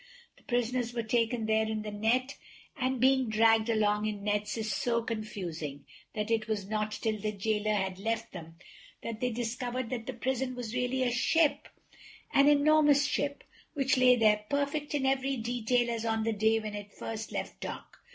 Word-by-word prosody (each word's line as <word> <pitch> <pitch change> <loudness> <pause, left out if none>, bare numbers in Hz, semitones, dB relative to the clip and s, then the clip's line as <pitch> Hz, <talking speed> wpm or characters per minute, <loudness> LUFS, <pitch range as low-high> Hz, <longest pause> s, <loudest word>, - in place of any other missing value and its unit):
The - - -23
prisoners 245 -1 -1
were 235 - -1
taken 230 0 0
there 220 0 +2
in 220 -1 -3
the 210 - -5
net, 240 +6 0 0.4
and 260 -3 -1
being 260 -1 +3
dragged 225 +1 +4
along 210 -1 +2
in 205 -2 -4
nets 210 +1 -1
is 215 -2 -2
so 235 -1 0
confusing, 180 -11 -5 0.3
that 210 +1 -2
it 220 -1 +1
was 210 -3 -2
not 215 0 -1
till 215 0 -2
the 215 +1 -2
Jailer 215 +1 0
had 190 -2 -2
left 225 +2 -2
them 165 -2 -9 0.5
that 225 -1 -5
they 250 - +1
discovered 245 +1 -3
that 240 -2 -4
the 260 - -3
prison 255 +1 -2
was 240 -3 -5
really 250 +1 0
a 245 - +1
ship—an 285 0 0
enormous 295 -1 +5
ship—which 285 -1 -2
lay 255 -1 +6
there, 215 -2 +3
perfect 285 +1 -1
in 275 -2 0
every 270 0 +1
detail 240 +1 0
as 230 -1 -3
on 225 -1 0
the 225 0 0
day 220 +1 +2
when 215 -1 -6
it 205 0 -7
first 220 +1 -6
left - - -5
dock. - - -7
225 Hz, 180 wpm, -30 LUFS, 215-255 Hz, 0.5 s, lay